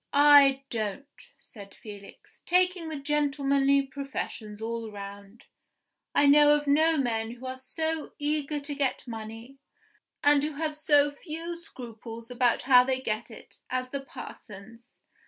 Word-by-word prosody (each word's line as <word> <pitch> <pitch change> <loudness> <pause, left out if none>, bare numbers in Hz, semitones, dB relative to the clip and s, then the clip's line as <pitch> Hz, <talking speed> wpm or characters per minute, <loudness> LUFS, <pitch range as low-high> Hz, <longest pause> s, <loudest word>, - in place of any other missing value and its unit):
"I 285 -2 +6
don't," 220 +3 -3 0.3
said 200 -4 -14
Felix. 205 -2 -13
"Taking 360 -1 +2
the 310 -3 -4
gentlemanly 280 -1 +2
professions 265 -6 -6
all 230 0 -4
round, 200 +2 -10 0.7
I 285 - +5
know 295 +1 +7
of 295 0 -2
no 315 +3 +3
men 225 -4 -1
who 245 +2 -12
are 255 0 -4
so 315 +4 -4
eager 295 0 -1
to 290 +1 -5
get 275 -3 -2
money, 225 +3 -8 0.6
and 290 -1 +5
who 305 +1 -2
have 305 +1 -3
so 290 -1 +3
few 335 +3 -7
scruples 230 -5 -10
about 245 -1 +1
how 250 -1 +7
they 260 0 -1
get 220 -2 -3
it, 200 -2 -14
as 255 0 -3
the 280 - -3
parsons. 230 -2 -12
275 Hz, 140 wpm, -27 LUFS, 230-295 Hz, 0.7 s, know